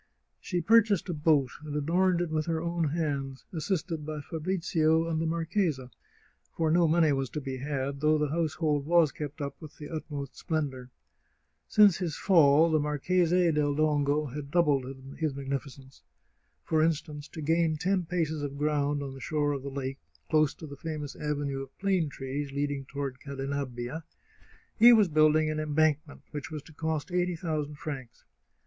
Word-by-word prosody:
" -, -, -50 dB
She 180 Hz, -2 st, 0 dB
purchased 210 Hz, 0 st, +4 dB
a -, -, 0 dB
boat, 150 Hz, -4 st, +2 dB
and 150 Hz, -1 st, -6 dB
adorned 175 Hz, +4 st, +2 dB
it 175 Hz, -2 st, -2 dB
with 155 Hz, 0 st, -1 dB
her 165 Hz, -1 st, 0 dB
own 170 Hz, 0 st, -1 dB
hands, 140 Hz, -4 st, -3 dB
assisted 165 Hz, -1 st, -2 dB
by 155 Hz, 0 st, -5 dB
Fabrizio 165 Hz, 0 st, 0 dB
and 160 Hz, -1 st, -1 dB
the 165 Hz, -, 0 dB
mar 165 Hz, 0 st, -1 dB
chesa, 160 Hz, -8 st, -1 dB, 0.7 s
for 160 Hz, -1 st, +2 dB
no 170 Hz, 0 st, +4 dB
money 160 Hz, -2 st, +4 dB
was 135 Hz, -2 st, -1 dB
to 150 Hz, -, -4 dB
be 135 Hz, -2 st, -5 dB
had, 140 Hz, 0 st, -3 dB
though 155 Hz, 0 st, +4 dB
the 150 Hz, -1 st, 0 dB
household 155 Hz, -2 st, 0 dB
was 170 Hz, -3 st, +4 dB
kept 150 Hz, +1 st, -6 dB
up 140 Hz, -1 st, -4 dB
with 155 Hz, -2 st, -11 dB
the 150 Hz, -, -8 dB
utmost 145 Hz, -4 st, -6 dB
splendour. 135 Hz, -6 st, -3 dB, 0.8 s
Since 205 Hz, -4 st, +6 dB
his 170 Hz, -5 st, -2 dB
fall 160 Hz, -3 st, +5 dB
the 155 Hz, -, +3 dB
Marchese 170 Hz, +4 st, +2 dB
del 145 Hz, -2 st, +1 dB
Dongo 150 Hz, -1 st, +2 dB
had 140 Hz, +1 st, -6 dB
doubled 150 Hz, -5 st, +2 dB, 0.3 s
his 155 Hz, -4 st, -1 dB
magnificence. 135 Hz, -1 st, -6 dB, 0.6 s
For 160 Hz, -1 st, +1 dB
instance, 150 Hz, -2 st, -1 dB
to 165 Hz, -, -10 dB
gain 160 Hz, 0 st, +2 dB
ten 180 Hz, +1 st, 0 dB
paces 160 Hz, -4 st, -1 dB
of 140 Hz, -1 st, -4 dB
ground 145 Hz, -1 st, 0 dB
on 135 Hz, -1 st, -6 dB
the 135 Hz, -, -10 dB
shore 150 Hz, -1 st, 0 dB
of 140 Hz, -2 st, -3 dB
the 140 Hz, -, -5 dB
lake, 135 Hz, -1 st, -4 dB, 0.3 s
close 155 Hz, -2 st, +3 dB
to 160 Hz, -, -9 dB
the 140 Hz, -2 st, -9 dB
famous 150 Hz, -1 st, -5 dB
avenue 145 Hz, -2 st, -2 dB
of 135 Hz, 0 st, -11 dB
plane 190 Hz, -5 st, +1 dB
trees 140 Hz, +1 st, -5 dB
leading 140 Hz, -1 st, -2 dB
toward 140 Hz, -2 st, -5 dB
Cadenabbia, 135 Hz, 0 st, -4 dB, 0.8 s
he 240 Hz, +2 st, +9 dB
was 210 Hz, -5 st, +5 dB
building 155 Hz, 0 st, +4 dB
an 155 Hz, -, -2 dB
embankment 155 Hz, -1 st, 0 dB
which 145 Hz, -3 st, -5 dB
was 155 Hz, -2 st, -6 dB
to 160 Hz, -, -16 dB
cost 160 Hz, +2 st, -3 dB
eighty 180 Hz, 0 st, +1 dB
thousand 155 Hz, -3 st, -3 dB
francs. 135 Hz, -6 st, -7 dB
150 Hz, 175 wpm, -29 LUFS, 140-165 Hz, 0.8 s, he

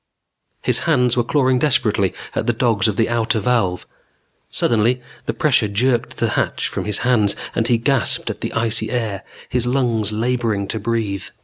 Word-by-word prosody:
His -, -, +2 dB
hands 125 Hz, -6 st, +3 dB
were 120 Hz, -, +2 dB
clawing 130 Hz, 0 st, +2 dB
desperately 110 Hz, -, +2 dB, 0.2 s
at -, -, -2 dB
the 120 Hz, -, +3 dB
dogs 115 Hz, -4 st, +1 dB
of 105 Hz, -, -1 dB
the 110 Hz, +1 st, +1 dB
outer 115 Hz, 0 st, 0 dB
valve. 100 Hz, -5 st, 0 dB, 0.6 s
Suddenly 120 Hz, +2 st, +1 dB, 0.3 s
the -, -, 0 dB
pressure 130 Hz, -7 st, +3 dB
jerked 120 Hz, +4 st, 0 dB
the -, -, 0 dB
hatch -, -, -1 dB
from -, -, -4 dB
his 105 Hz, -2 st, 0 dB
hands 110 Hz, -5 st, +3 dB, 0.2 s
and 115 Hz, -, 0 dB
he 120 Hz, -, +3 dB
gasped 125 Hz, 0 st, +1 dB
at -, -, -10 dB
the -, -, -3 dB
icy 115 Hz, -1 st, +1 dB
air, 110 Hz, -6 st, -2 dB, 0.3 s
his 125 Hz, -1 st, -1 dB
lungs 120 Hz, -5 st, 0 dB
laboring 115 Hz, -3 st, -1 dB
to 110 Hz, -, -2 dB
breathe. 110 Hz, -3 st, -2 dB
115 Hz, 175 wpm, -20 LUFS, 105-125 Hz, 0.6 s, hands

